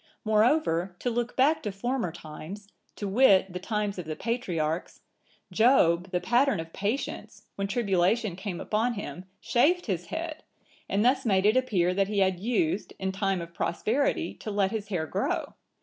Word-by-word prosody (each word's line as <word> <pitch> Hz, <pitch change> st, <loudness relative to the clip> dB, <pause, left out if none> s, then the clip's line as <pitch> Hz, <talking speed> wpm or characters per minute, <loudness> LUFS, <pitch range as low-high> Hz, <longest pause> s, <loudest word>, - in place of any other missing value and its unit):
Moreover, 215 Hz, -, +2 dB
to 245 Hz, -, -2 dB
look 240 Hz, +1 st, -2 dB
back 290 Hz, +5 st, +3 dB
to 210 Hz, -, -3 dB
former 235 Hz, -1 st, -2 dB
times, 170 Hz, +5 st, -9 dB, 0.3 s
to 205 Hz, -, -4 dB
wit, 195 Hz, -4 st, +4 dB
the 180 Hz, -, -4 dB
times 210 Hz, 0 st, -2 dB
of 175 Hz, -, -5 dB
the 155 Hz, -, -3 dB
patriarchs, 175 Hz, -9 st, -2 dB, 0.5 s
Job, 190 Hz, -7 st, +4 dB
the 180 Hz, -1 st, 0 dB
pattern 245 Hz, +2 st, +2 dB
of 165 Hz, 0 st, -7 dB
patience, 215 Hz, +8 st, -4 dB
when 200 Hz, 0 st, -3 dB
tribulation 200 Hz, -2 st, +1 dB
came 190 Hz, -1 st, -5 dB
upon 230 Hz, +3 st, 0 dB
him, 190 Hz, -3 st, -6 dB
shaved 340 Hz, +12 st, +2 dB
his 180 Hz, -5 st, -3 dB
head,(979) 320 Hz, -1 st, -5 dB, 0.5 s
and 205 Hz, +3 st, +1 dB
thus 260 Hz, +1 st, +3 dB
made 195 Hz, -5 st, +2 dB
it 215 Hz, +3 st, +5 dB
appear 200 Hz, -9 st, +2 dB
that 195 Hz, +1 st, +1 dB
he 210 Hz, 0 st, -3 dB
had 190 Hz, -2 st, +2 dB
used, 205 Hz, -4 st, 0 dB
in 190 Hz, 0 st, -2 dB
time 195 Hz, -2 st, -1 dB
of 170 Hz, 0 st, -9 dB
prosperity, 270 Hz, -, 0 dB
to -, -, -8 dB
let 200 Hz, -2 st, +1 dB
his 215 Hz, -2 st, -3 dB
hair 175 Hz, -6 st, -2 dB
grow. -, -, -2 dB
200 Hz, 170 wpm, -28 LUFS, 180-240 Hz, 0.5 s, it